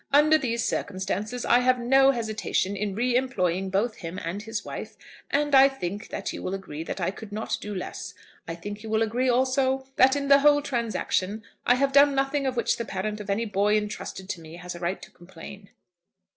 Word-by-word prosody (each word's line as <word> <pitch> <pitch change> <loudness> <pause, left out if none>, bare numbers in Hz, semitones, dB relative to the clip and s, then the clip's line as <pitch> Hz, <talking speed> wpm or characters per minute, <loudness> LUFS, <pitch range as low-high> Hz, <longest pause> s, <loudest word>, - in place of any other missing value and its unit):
"Under 300 +2 +6
these 235 -6 0
circumstances, 205 +5 -3
I 240 - +5
have 255 0 +3
no 270 +3 +4
hesitation 215 -5 -1
in 200 -1 -3
re 245 +2 +1
employing 190 -8 0
both 210 +4 0
him 170 +1 -7
and 180 +5 -3
his 220 -1 -5
wife; - - -7 0.3
and 290 0 0
I 270 0 +8
think 205 -5 -5
that - - -4
you - - -6
will 185 - -3
agree 190 -6 -7
that 165 - -5
I 175 +1 0
could 205 +1 -11
not 215 +2 -3
do 210 -1 -5
less. 185 0 -6 0.3
I 165 - -4
think 205 +4 -7
you 220 - -8
will 220 +1 +2
agree, 245 +4 0
also, 260 +1 +1
that 265 +1 +6
in 280 -1 -2
the 280 0 +7
whole 290 0 +5
transaction 220 -5 -1 0.2
I 245 - +6
have 275 +2 +1
done 280 0 +6
nothing 275 +1 0
of 260 - -1
which 235 - +1
the 235 - -2
parent 210 +2 -3
of 205 -1 -8
any 210 +4 0
boy 210 0 +2
intrusted 210 -2 -5
to 175 - -4
me 160 0 -11
has 180 +1 -7
a 175 - -9
right 175 +2 -2
to - - -12
complain." 190 +3 -12
220 Hz, 215 wpm, -26 LUFS, 195-260 Hz, 0.3 s, I